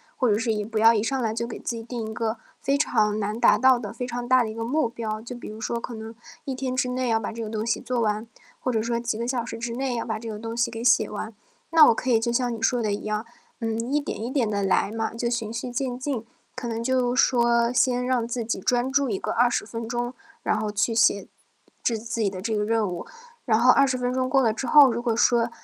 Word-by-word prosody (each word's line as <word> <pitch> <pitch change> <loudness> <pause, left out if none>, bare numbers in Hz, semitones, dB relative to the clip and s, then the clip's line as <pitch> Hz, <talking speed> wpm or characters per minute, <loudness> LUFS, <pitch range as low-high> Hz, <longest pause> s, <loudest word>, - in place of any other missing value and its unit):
或 255 - +1
者 205 - +3
是 225 0 0
也 210 - -2
不 220 +1 -5
要 225 +1 +6
一 215 - +1
上 265 +5 -1
来 225 -3 -1
就 235 +1 -3
给 230 - -6
自 235 - -4
己 230 - -5
定 235 0 -5
一 - - -6
个 225 0 -2 0.2
非 275 +1 +1
常 215 -7 +1
难 210 +2 -2
达 - - +5
到 255 +2 +5
的 210 -4 -6
非 240 +2 -5
常 245 0 -4
大 255 0 +5
的 220 - -4
一 - - -6
个 225 - -4
目 260 +3 +1
标， 225 -2 -4
就 235 +3 -8
比 240 - -9
如 215 - -9
说 235 +1 -2
可 235 0 -7
能 220 +1 -8 0.3
1 270 - -3
天 255 0 -3
之 255 - +1
内 250 0 -1
要 225 -1 +2
把 220 - -4
这 230 +1 -6
个 215 - -5
东 220 0 -3
西 235 - 0
做 250 -1 -2
完， 215 0 0 0.3
或 255 - -1
者 225 - +1
说 235 +1 -1
几 235 -2 -2
个 235 - -3
小 245 -2 -1
时 230 -1 -6
之 230 0 -4
内 260 0 -2
要 230 - -2
把 220 -2 -3
这 230 0 -7
个 215 - -5
东 225 +1 -6
西 235 0 +1
给 230 0 -6
写 235 -3 +4
完。 215 +2 -6 0.4
那 320 -2 +8
我 - - +5
可 255 - -1
以 225 - +5
就 235 +1 -1
像 240 0 0
你 225 - -9
说 245 +2 +2
的 215 -3 0
一 205 - -5
样， 215 +1 -2 0.3
嗯， 230 +1 -2
一 295 - +3
点 285 - -5
一 235 - -3
点 260 -4 +1
地 205 -1 -1
来 195 +1 +1
嘛， 225 0 -3
就 235 +1 -1
循 235 -2 -2
序 240 +2 -4
渐 245 0 -2
进。 255 -4 -3 0.3
可 255 -1 -5
能 230 0 -3
就 250 0 +1
是 265 - +6
说 235 -1 +2
先 250 0 +2
让 250 -2 0
自 240 0 -3
己 225 -2 -2
专 245 +6 +1
注 280 -1 +2
一 200 - -1
个 - - -3
20 240 -2 +2
分 230 +1 -6
钟， 240 +1 -2 0.3
然 - - +1
后 215 -1 -2
去 205 +3 0
写 205 -3 +3 0.6
制 230 - 0
自 225 +1 -4
己 205 - +2
的 190 -1 -7
这 220 +3 -2
个 210 - 0
任 225 -1 +1
务。 175 - -6 0.4
然 220 -3 +3
后 250 +2 +6
20 270 -1 +3
分 250 0 -1
钟 255 0 0
过 270 0 +3
了 225 -2 +2
之 250 +3 -4
后， 285 -1 +8
如 235 +1 -2
果 235 -2 0
说 235 0 +3
235 Hz, 295 characters per minute, -25 LUFS, 220-250 Hz, 0.6 s, 那